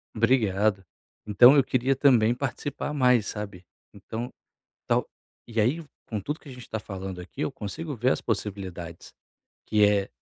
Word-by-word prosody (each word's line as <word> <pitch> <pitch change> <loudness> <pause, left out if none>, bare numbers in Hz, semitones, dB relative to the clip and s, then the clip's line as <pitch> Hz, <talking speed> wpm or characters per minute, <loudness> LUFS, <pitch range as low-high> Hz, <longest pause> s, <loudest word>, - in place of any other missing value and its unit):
Obrigado. 110 -4 +2 0.4
Então 120 +6 +7
eu 140 - +6
queria 130 +2 +1
também 120 -4 +4
participar 140 +2 -4
mais 125 -6 +3
sabe, 100 -4 -6 0.3
então 110 +4 -6 0.6
tal - - +1 0.4
e 115 -2 0
aí 140 +10 +1 0.3
com 110 -3 -3
tudo 150 - -4
que 145 - -14
a - - -8
gente 125 -1 -10
está 110 - -5
falando 95 -3 -6
aqui - - -9
eu - - -1
consigo 145 +8 -6
ver 125 +4 +2
as - - 0
possibilidades 95 -6 -5 0.5
que 105 -1 +4
é 100 -1 +2
110 Hz, 160 wpm, -26 LUFS, 100-130 Hz, 0.6 s, Então